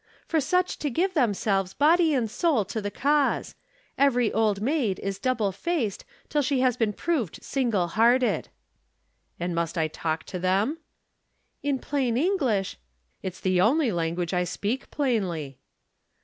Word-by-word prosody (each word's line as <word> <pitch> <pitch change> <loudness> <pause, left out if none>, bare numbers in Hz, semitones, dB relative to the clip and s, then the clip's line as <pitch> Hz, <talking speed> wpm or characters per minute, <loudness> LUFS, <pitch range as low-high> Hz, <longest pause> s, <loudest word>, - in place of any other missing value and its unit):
"For 320 -2 +1
such 360 +6 0
to 295 - -1
give 365 +9 0
themselves 200 - +1
body 320 +1 +4
and 240 -4 +1
soul 240 - +1
to 220 +3 -4
the 205 - -3
cause. 285 +5 +1 0.5
Every 245 -5 +3
Old 215 -3 +2
Maid 235 -4 0
is 195 -1 -4
double 230 -6 0
faced 235 - -2 0.2
till 295 - +1
she 275 -1 +1
has 255 -2 +3
been 225 -4 +1
proved 245 - -2
single 230 -10 0
hearted." 240 +6 +2 0.9
"And 175 0 -2
must 170 0 -2
I 160 -1 +2
talk 155 0 -3
to 185 - -6
them?" 195 - +1 0.8
"In 285 -1 0
plain 255 -4 -1
English 265 - 0 0.2
" 60 - -46
"It's 185 -2 -5
the 185 -1 +2
only 260 - +3
language 170 0 -2
I 180 0 +2
speak 205 +8 -3
plainly." 185 - -1
225 Hz, 150 wpm, -26 LUFS, 185-280 Hz, 0.9 s, body